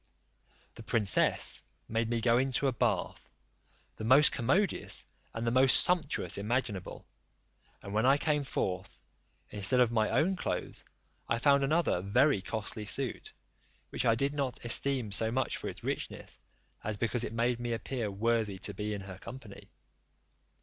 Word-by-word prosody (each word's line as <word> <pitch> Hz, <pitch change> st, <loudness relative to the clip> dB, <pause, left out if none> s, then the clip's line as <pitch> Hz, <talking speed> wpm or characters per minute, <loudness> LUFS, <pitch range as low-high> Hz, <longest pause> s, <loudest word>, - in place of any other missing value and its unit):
The -, -, -11 dB
princess 110 Hz, -3 st, +1 dB, 0.3 s
made 115 Hz, 0 st, -1 dB
me 115 Hz, -1 st, -1 dB
go 115 Hz, +1 st, +3 dB
into 135 Hz, +1 st, 0 dB
a 135 Hz, -, +3 dB
bath, -, -, -1 dB, 0.7 s
the -, -, -6 dB
most 130 Hz, +6 st, +6 dB
commodious, 175 Hz, -, +1 dB, 0.3 s
and 115 Hz, +1 st, -4 dB
the 115 Hz, -, +1 dB
most 130 Hz, +1 st, +5 dB
sumptuous 150 Hz, -, +1 dB
imaginable; 105 Hz, -3 st, -3 dB, 0.8 s
and 100 Hz, -, -7 dB
when 110 Hz, +4 st, +2 dB
I 135 Hz, +1 st, +5 dB
came 150 Hz, -1 st, 0 dB
forth, 95 Hz, -7 st, -3 dB, 0.5 s
instead 105 Hz, +5 st, +3 dB
of 120 Hz, -2 st, +4 dB
my 110 Hz, -2 st, +1 dB
own 155 Hz, +11 st, +2 dB
clothes -, -, -4 dB, 0.5 s
I 115 Hz, -, +2 dB
found 140 Hz, +3 st, +4 dB
another 150 Hz, -, +1 dB
very 105 Hz, +4 st, +2 dB
costly 105 Hz, +1 st, -4 dB
suit, 130 Hz, +2 st, 0 dB, 0.6 s
which -, -, -1 dB
I 115 Hz, -2 st, +3 dB
did 140 Hz, +4 st, -1 dB
not 135 Hz, -4 st, -3 dB
esteem 125 Hz, -1 st, 0 dB
so 110 Hz, +3 st, +2 dB
much 130 Hz, +2 st, -1 dB
for -, -, -5 dB
its -, -, -10 dB
richness, -, -, -5 dB, 0.4 s
as 105 Hz, -1 st, -3 dB
because 115 Hz, +2 st, 0 dB
it -, -, -4 dB
made 120 Hz, +1 st, 0 dB
me 120 Hz, 0 st, -3 dB
appear 115 Hz, -1 st, -3 dB
worthy 110 Hz, 0 st, 0 dB
to 100 Hz, +2 st, -3 dB
be 105 Hz, +2 st, -3 dB
in 100 Hz, -, -6 dB
her 95 Hz, -1 st, -9 dB
company. 115 Hz, -3 st, -11 dB
115 Hz, 155 wpm, -31 LUFS, 105-135 Hz, 0.8 s, most